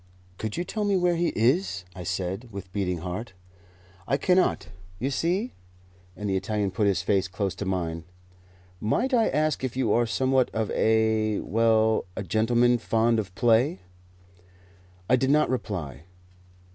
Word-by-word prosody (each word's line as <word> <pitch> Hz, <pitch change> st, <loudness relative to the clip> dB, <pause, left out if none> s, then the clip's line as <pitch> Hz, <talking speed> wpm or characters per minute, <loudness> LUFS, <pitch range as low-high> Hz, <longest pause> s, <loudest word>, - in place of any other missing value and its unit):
"Could 110 Hz, -1 st, -4 dB
you 175 Hz, -, 0 dB
tell 210 Hz, +4 st, -3 dB
me 200 Hz, -2 st, +2 dB
where 175 Hz, -1 st, +2 dB
he 170 Hz, +1 st, +1 dB
is?" 115 Hz, -, +1 dB
I 90 Hz, -, -7 dB
said, 90 Hz, +6 st, -3 dB
with 95 Hz, -2 st, -9 dB
beating 90 Hz, -5 st, -2 dB
heart. 95 Hz, +4 st, -5 dB, 0.7 s
"I 135 Hz, -, +2 dB
cannot. 180 Hz, -, +2 dB, 0.3 s
You 135 Hz, +6 st, -2 dB
see 180 Hz, -, -1 dB, 0.3 s
" 90 Hz, 0 st, -29 dB
and 105 Hz, -, -4 dB
the 95 Hz, -, 0 dB
Italian 105 Hz, 0 st, -1 dB
put 105 Hz, +2 st, +1 dB
his 95 Hz, -2 st, +1 dB
face 95 Hz, 0 st, +1 dB
close 95 Hz, 0 st, -2 dB
to 100 Hz, -, -6 dB
mine. 85 Hz, -3 st, -2 dB, 0.7 s
"Might 245 Hz, -, 0 dB
I 230 Hz, -3 st, +4 dB
ask 155 Hz, -2 st, 0 dB
if 130 Hz, -1 st, -3 dB
you 120 Hz, -5 st, +2 dB
are 120 Hz, 0 st, +2 dB
somewhat 130 Hz, +2 st, +2 dB
of 110 Hz, -1 st, -1 dB
a 110 Hz, -1 st, +2 dB
well, 110 Hz, 0 st, +2 dB
a 110 Hz, -, -4 dB
gentleman 120 Hz, +5 st, +2 dB
fond 115 Hz, +1 st, +2 dB
of 95 Hz, -3 st, -5 dB
play?" 120 Hz, -, +2 dB, 1.3 s
I 125 Hz, -, +5 dB
did 130 Hz, +1 st, 0 dB
not 150 Hz, -2 st, +3 dB
reply. 85 Hz, -, -4 dB
110 Hz, 160 wpm, -26 LUFS, 95-130 Hz, 1.3 s, I